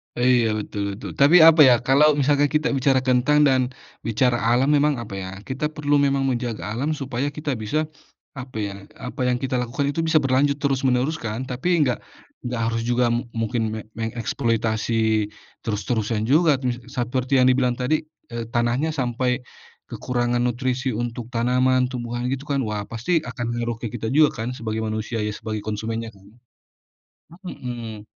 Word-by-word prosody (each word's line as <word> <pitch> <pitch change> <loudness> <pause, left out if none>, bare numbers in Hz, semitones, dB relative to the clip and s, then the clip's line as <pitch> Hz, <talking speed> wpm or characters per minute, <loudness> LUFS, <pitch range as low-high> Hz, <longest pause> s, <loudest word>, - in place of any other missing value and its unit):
Iya 120 -1 +3
betul 105 0 -5
betul 110 - -7
tapi 145 +6 +7
apa 165 0 +7
ya 125 - +7
kalau 150 +3 +5
misalnya 145 +1 +3
kita 150 +1 +2
bicara 130 0 +2
kentang 130 +3 +3
dan, 130 -1 +3 0.5
bicara 120 +2 +2
alam 125 +5 +3
emang 150 0 +2
apa 115 -4 -7
ya 95 -1 -5
kita 130 +7 -2
perlu 145 -1 +2
memang 140 -1 +2
menjaga 120 -3 -2
alam 125 +7 -2
supaya 135 -2 -3
kita 150 -1 -2
bisa, 130 +9 -1 0.6
apa 125 -1 -9
ya 100 - -3 0.2
apa 130 +4 -7
yang 125 - +2
kita 130 0 -1
lakukan 125 +4 -2
itu 155 - -4
bisa 160 - 0
berlanjut 135 +2 +2
terus 135 -2 +2
menerus 130 +5 +1
kan 115 +2 -4
tapi 125 +7 -3
enggak 130 -5 +1 0.4
enggak 125 -1 -3
harus 115 0 0
juga 120 0 +2
mungkin 115 0 -2
me - - -4 0.2
mengeksploitasi 110 -1 0 0.4
terus-terusan 110 0 -1
juga 160 +2 +5 0.4
seperti 130 +1 -1
yang - - +5
dibilang 125 -1 +1
tadi, 130 +6 +1 0.3
eee, 115 -1 -4
tanahnya 120 +7 +1
sampai, 125 -1 -1 0.5
kekurangan 120 -1 -1
nutrisi 125 +1 -1
untuk 120 0 -4
tanaman, 125 +1 +2
tumbuhan 120 -1 -4
gitu 135 +2 -4
kan 140 -2 0
wah 105 -1 -2
pasti 120 +10 0
akan 125 -5 -5
ngaruh 120 0 -2
ke 115 - -3
kita 110 -2 -3
juga 155 0 +6
kan 120 - -3
sebagai 110 -2 -3
manusia 110 +1 -3
ya, 105 - -1
sebagai 110 -1 -4
konsumennya 110 +2 -3
kan. 95 - -19 1.2
Mhm. 115 -8 -6
125 Hz, 160 wpm, -23 LUFS, 115-135 Hz, 1.2 s, tapi